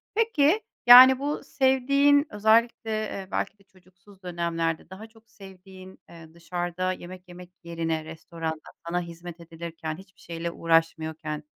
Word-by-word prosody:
Peki, 430 -4 +2 0.3
yani, 255 +2 +10
bu 290 +2 -3
sevdiğin, 280 +2 +2
özellikle, 220 +2 +1
eee, 195 -3 -6
belki 205 - -3
de - - -24
çocuksuz 185 +1 -23
dönemlerde 170 -2 -3
daha 205 +4 -11
çok 225 0 -24
sevdiğin, 190 -1 -14
eee, 165 -1 -14
dışarıda 175 +1 -4
yemek 180 +1 -11
yemek 180 0 -12
yerine 165 -2 -3
restoranda 160 0 -7 0.3
sana 175 +1 -1
hizmet 170 0 -10
edilirken, 165 -1 -8
hiçbir 190 0 -17
şeyle 170 0 -6
uğraşmıyorken, 160 -2 -1
180 Hz, 130 wpm, -25 LUFS, 165-220 Hz, 0.3 s, yani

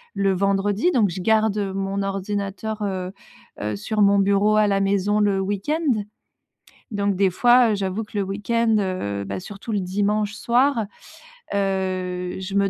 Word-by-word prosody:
le 195 -1 +2
vendredi, 200 - +1
donc 215 - +3
je 180 +2 -5
garde 220 0 +2 0.2
mon 195 0 -2
ordinateur, 200 +2 -3
heu 185 -1 -3 0.5
heu, 105 0 -2
sur 210 - -2
mon 200 0 +5
bureau 200 +2 +3
à 210 -1 +4
la 195 -1 +1
maison, 200 +1 +1
le 200 -2 +2
week-end. 215 - -1 0.9
Donc, 200 -1 0
des 195 -1 +3
fois, 240 +4 +4
heu, - - +1
j'avoue 195 +2 -2
que 210 - -8
le 200 - +1
week-end, 220 +3 0
heu, 100 - -2
bah - - -4
surtout 205 +3 -7
le 200 - 0
dimanche 205 +3 0
soir, 240 -1 +2 0.7
heu, 185 -2 -2
je 190 +1 -5
me 200 -1 +3
200 Hz, 160 wpm, -23 LUFS, 195-215 Hz, 0.9 s, mon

